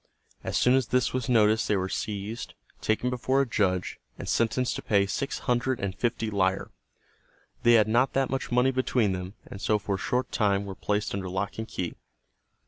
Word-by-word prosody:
As - - -1
soon 125 - +4
as 130 -3 +2
this 125 -1 +1
was 130 -2 -2
noticed 110 -2 +4
they 105 - +2
were 95 0 -1
seized, 105 +3 -4 0.3
taken 115 +3 0
before 130 +2 +1
a 140 - +3
judge, 95 -6 0 0.2
and - - -7
sentenced 120 +2 +1
to - - -5
pay 100 -2 +2
six 135 +7 -2
hundred 125 0 0
and 95 -2 -3
fifty 115 0 -1
lire. 95 -1 0 0.9
They 120 - +5
had 110 -2 +5
not 120 +4 +2
that 135 -2 +1
much 135 -2 -3
money 125 +2 +4
between 125 -5 +1
them, 90 +2 -5
and 100 - -9
so 105 - +2
for 100 -1 -3
a - - 0
short 125 +5 -1
time 100 -2 +1
were 100 - -5
placed 105 +2 -1
under 95 -2 -3
lock 95 +4 -3
and 110 - -4
key. 90 -5 -4
110 Hz, 200 wpm, -27 LUFS, 100-125 Hz, 0.9 s, They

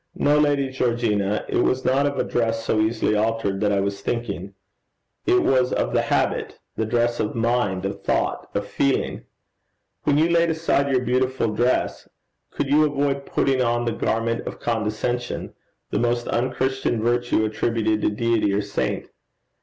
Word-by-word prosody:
No, 150 +1 +3
Lady 145 -2 +2
Georgina, 115 -5 0
it - - -1
was 130 +1 +1
not 140 +2 +3
of 145 - -3
a - - +2
dress 115 -1 -1
so 110 - +1
easily 110 0 +1
altered 110 -2 0
that 105 -1 +2
I 100 -1 +2
was 100 0 -3
thinking; 100 -5 -4 0.7
it 365 +1 +4
was 130 -1 +2
of - - -1
the - - +3
habit, - - -1 0.2
the 110 - -1
dress 120 +1 +1
of 105 - -1
mind, 115 -5 0
of 100 - -4
thought, - - -1
of - - -1
feeling. 140 -1 -1 0.8
When 145 - +2
you 160 +2 +4
laid 170 0 +3
aside 160 -3 +1
your 130 -2 +2
beautiful 130 -1 +1
dress, 120 +4 0 0.4
could - - -2
you 150 +3 +4
avoid 140 -2 0
putting 135 -2 +1
on 120 -1 +1
the 115 - 0
garment 115 +1 -1
of - - -6
condescension, 115 +2 -2 0.4
the - - 0
most 120 0 0
unchristian 130 -1 0
virtue 120 -2 +1
attributed 110 0 0
to - - +2
Deity 110 -1 +1
or 100 - +1
saint? 100 0 -2
120 Hz, 165 wpm, -23 LUFS, 110-130 Hz, 0.8 s, it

